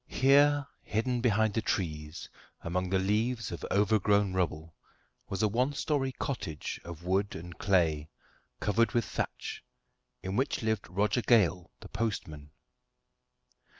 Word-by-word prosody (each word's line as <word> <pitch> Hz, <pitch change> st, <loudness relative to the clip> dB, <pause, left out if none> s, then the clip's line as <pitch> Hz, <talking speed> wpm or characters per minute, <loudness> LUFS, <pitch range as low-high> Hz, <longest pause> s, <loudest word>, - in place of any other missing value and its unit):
Here, 145 Hz, +2 st, +4 dB, 0.2 s
hidden 120 Hz, +3 st, -1 dB
behind 110 Hz, -3 st, +2 dB
the 115 Hz, -, 0 dB
trees, 75 Hz, -6 st, -3 dB, 0.3 s
among 90 Hz, +2 st, -2 dB
the 95 Hz, -, +2 dB
leaves 110 Hz, +4 st, 0 dB
of 85 Hz, -, -6 dB
overgrown 105 Hz, -1 st, +3 dB
rubble, 80 Hz, -3 st, -2 dB, 0.6 s
was 95 Hz, +1 st, -2 dB
a -, -, +5 dB
one 125 Hz, +7 st, +1 dB
story 140 Hz, -2 st, 0 dB
cottage 105 Hz, -, -4 dB
of 85 Hz, -1 st, -9 dB
wood 95 Hz, +3 st, 0 dB
and 85 Hz, +1 st, -8 dB
clay, 80 Hz, -6 st, +2 dB, 0.5 s
covered 115 Hz, +3 st, +2 dB
with 120 Hz, -3 st, +2 dB
thatch, -, -, -4 dB, 0.6 s
in 95 Hz, +1 st, -3 dB
which 130 Hz, 0 st, 0 dB
lived 110 Hz, -4 st, -1 dB
Roger 105 Hz, +6 st, +1 dB
Gale, 95 Hz, -6 st, +3 dB
the -, -, -9 dB
postman. 80 Hz, -10 st, -4 dB
100 Hz, 130 wpm, -30 LUFS, 90-115 Hz, 0.6 s, a